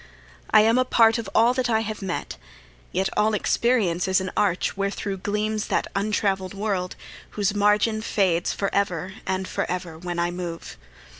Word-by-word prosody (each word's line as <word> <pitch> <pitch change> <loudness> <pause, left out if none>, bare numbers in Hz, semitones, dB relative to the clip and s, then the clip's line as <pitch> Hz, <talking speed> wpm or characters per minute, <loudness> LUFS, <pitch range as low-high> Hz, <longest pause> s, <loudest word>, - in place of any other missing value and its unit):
I 215 - +7
am 225 +3 +4
a - - +4
part 230 -2 +4
of 220 -4 -5
all 235 +2 +5
that 255 -1 -1
I 220 -1 +2
have 215 -1 -5
met; 190 -3 -4 0.6
Yet 190 +2 0
all 215 0 +2
experience 205 -6 +1
is 190 0 +3
an 185 0 -4
arch 185 -4 +1
wherethro' 200 0 -2
Gleams 210 +2 -2
that - - 0
untravell'd 195 -2 0
world 195 -3 -2 0.4
whose 200 -1 +1
margin 210 +2 +2
fades 185 -5 +1
For 195 - -2
ever 185 -2 -1
and 190 0 -1
forever 180 -3 -3
when 175 0 -5
I 175 0 0
move. 175 -2 -6
200 Hz, 165 wpm, -24 LUFS, 185-215 Hz, 0.6 s, I